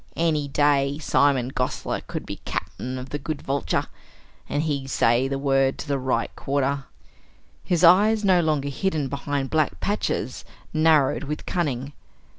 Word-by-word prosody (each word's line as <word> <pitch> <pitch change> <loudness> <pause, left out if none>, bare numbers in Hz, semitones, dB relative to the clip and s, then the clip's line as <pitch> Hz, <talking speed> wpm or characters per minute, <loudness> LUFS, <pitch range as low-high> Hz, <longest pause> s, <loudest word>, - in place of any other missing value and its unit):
"Any 155 -3 +1
day, 140 0 +2
Simon 140 -5 +2
Gosler 125 -1 -2
could - - -6
be - - -6
Cap'n 130 +1 -5
of 130 +1 -7
the 145 - -4
good 155 +1 -4
Vulture, 135 - -1 0.6
an 145 - 0
he 145 -4 -2
say 120 0 +2
the 135 0 -2
word 135 -1 +2
to - - -7
the 140 -1 0
right 130 -3 -1
quarter!" 140 0 -1 0.8
His 175 -1 0
eyes, 205 +5 +6
no 185 -2 +5
longer 150 -3 0
hidden 150 -1 -1
behind 140 -1 -3
black 155 -2 +1
patches, 205 +1 -2 0.3
narrowed 155 -3 +3
with 150 +2 -5
cunning. 145 -5 -2
140 Hz, 150 wpm, -24 LUFS, 135-155 Hz, 0.8 s, eyes